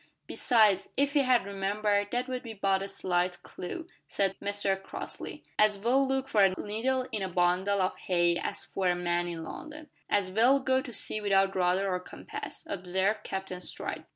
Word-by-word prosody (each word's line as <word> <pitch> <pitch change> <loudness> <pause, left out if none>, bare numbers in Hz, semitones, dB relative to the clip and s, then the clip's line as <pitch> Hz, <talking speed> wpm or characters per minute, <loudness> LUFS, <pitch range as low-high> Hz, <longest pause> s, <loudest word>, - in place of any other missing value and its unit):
"Besides, 215 -5 +3
if 285 +1 +2
he 295 - +4
had 255 -5 +3
remembered, 205 +1 0
that 245 +3 -1
would 255 -1 -3
be 225 -2 -8
but 195 -1 +1
a 195 - -3
slight 180 -2 -1
clue," 315 - -6 0.2
said 195 -1 0
Mr 200 -1 -1
Crossley. - - -7 0.2
"As 215 -1 +5
well 255 +6 +2
look 265 0 0
for 215 -6 +3
a 190 -1 +4
needle 250 +5 -1
in 215 - -2
a 190 - -2
bundle 180 +3 +2
of 185 - -1
hay 175 -2 +2
as - - -2
for 190 -1 -2
a 175 - +2
man 175 0 0
in 165 -2 -5
London." 305 - -9 0.2
"As 195 -2 +1
well 240 +7 +5
go 260 -1 +2
to 260 -3 -8
sea 215 -1 +1
without 195 -1 +3
rudder 185 +1 +2
or 180 -1 0
compass," 180 - -8
observed 190 +2 0
Captain 190 -1 -5
Stride. - - -3
200 Hz, 185 wpm, -29 LUFS, 185-235 Hz, 0.2 s, As